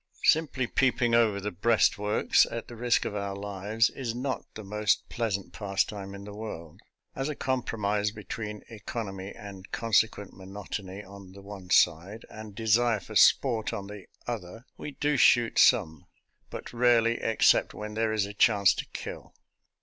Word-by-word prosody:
Simply 150 -5 +2
peeping 120 -1 +1
over 110 -4 +3
the 105 +1 -4
breastworks, 105 +1 +2
at 115 - -6
the 120 - -10
risk 120 +1 +1
of - - -3
our 100 -1 -3
lives, 100 +2 0
is 120 -4 -4
not 130 0 -4
the 110 - -7
most 105 0 0
pleasant 105 -5 -3
pastime 100 -1 -2
in 100 - -9
the 105 0 -9
world. 95 -7 -8 0.3
As 135 +2 -2
a 150 - -3
compromise 105 -6 -1
between 105 0 -7
econ 115 +1 -6
omy 95 +1 -8
and 100 -2 -10
consequent 110 -3 +1
monotony 95 0 -7
on 100 -1 -13
the 100 0 -13
one 100 -2 -10
side, 90 +6 +2
and 110 -2 -10
desire 115 +1 +2
for - - -11
sport 115 -5 +4
on 100 -3 -4
the 100 -1 -10 0.2
other, 115 0 -6
we - - -7
do 145 +1 0
shoot 120 -2 +4
some; 80 - +3 0.4
but - - -8
rarely 120 -1 +3
except 115 - +3
when 105 0 -6
there 110 0 0
is 110 -2 +1
a 100 - -8
chance 100 -2 +4
to - - -6
kill. - - -8
105 Hz, 165 wpm, -28 LUFS, 100-115 Hz, 0.4 s, sport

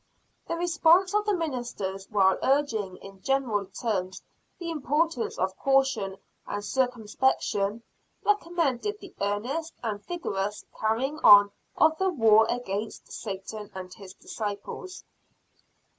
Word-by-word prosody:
The - - -1
response 350 +2 +4
of 420 0 +1
the 415 - +3
ministers, 240 - -4
while 190 -3 +3
urging 225 -9 +1
in 195 -1 -12
general 250 -8 0
terms 190 -6 -3 0.3
the 335 -1 -4
importance 300 -2 0
of 190 +1 -1
caution 265 -8 +2 0.3
and 205 0 -4
circumspection, 230 -3 0 0.4
recommended 350 - 0
the 390 - -12
earnest 245 +11 -2
and 210 -3 -3
vigorous 210 - -3
carrying 255 +8 0
on 205 -4 +8 0.3
of 315 0 +4
the 380 0 +2
war 225 -8 +5
against 220 -3 -4
Satan 205 0 -6
and 185 -1 -7
his 195 -2 -12
disciples. 215 - -6
230 Hz, 115 wpm, -27 LUFS, 205-315 Hz, 0.4 s, on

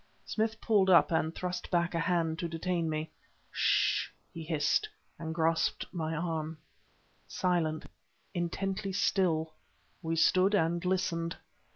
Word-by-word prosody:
Smith 220 0 -1
pulled 205 -4 +3
up, 175 -2 +6
and 160 0 0
thrust 180 0 -4
back 175 -1 +1
a 165 - 0
hand 165 -1 0
to 170 - -1
detain 165 0 -1
me. 155 0 -3 0.4
"Ssh!" - - +2 0.2
he 165 - -7
hissed, 155 -3 +1 0.3
and 160 -1 -4
grasped 165 0 +1
my 160 -3 -2
arm. 160 -1 -3 0.7
Silent, 170 -4 0 0.5
intently 195 +3 -2
still, 180 -5 +1 0.5
we 165 -1 -1
stood 185 +5 +4
and 170 -2 +1
listened. 175 -2 -1
170 Hz, 130 wpm, -31 LUFS, 160-185 Hz, 0.7 s, up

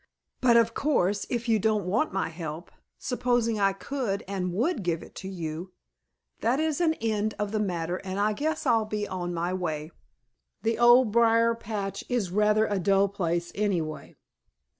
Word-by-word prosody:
But 240 -2 +5
of 230 0 +3
course, 205 -10 +1
if 240 -1 -2
you 225 -2 +3
don't 215 -2 +1
want 220 +12 +1
my 195 0 -1
help, 160 0 -7 0.3
supposing 245 -3 0
I 195 -1 +4
could 210 0 -3
and 190 -2 -2
would 240 - 0
give 170 -3 -1
it - - -14
to 190 - -6
you, 170 0 -5 0.7
that 245 +5 +1
is 315 +1 0
an 320 -2 +3
end 215 -3 -1
of 210 -1 -2
the 215 - 0
matter, 175 -3 -1
and 190 +1 -5
I 210 +1 +2
guess 310 +7 -2
I'll 225 -2 +3
be 210 -1 -3
on 175 -1 -4
my 175 +1 -2
way. 160 -4 -3 0.7
The 225 0 0
Old 240 -1 +6
Briar 230 0 +4
patch 210 -3 -4
is 230 -8 -1
rather 210 +2 +3
a 205 -2 -1
dull 195 +2 +3
place 175 -3 -2
anyway." 165 -8 -2
205 Hz, 175 wpm, -27 LUFS, 180-230 Hz, 0.7 s, Old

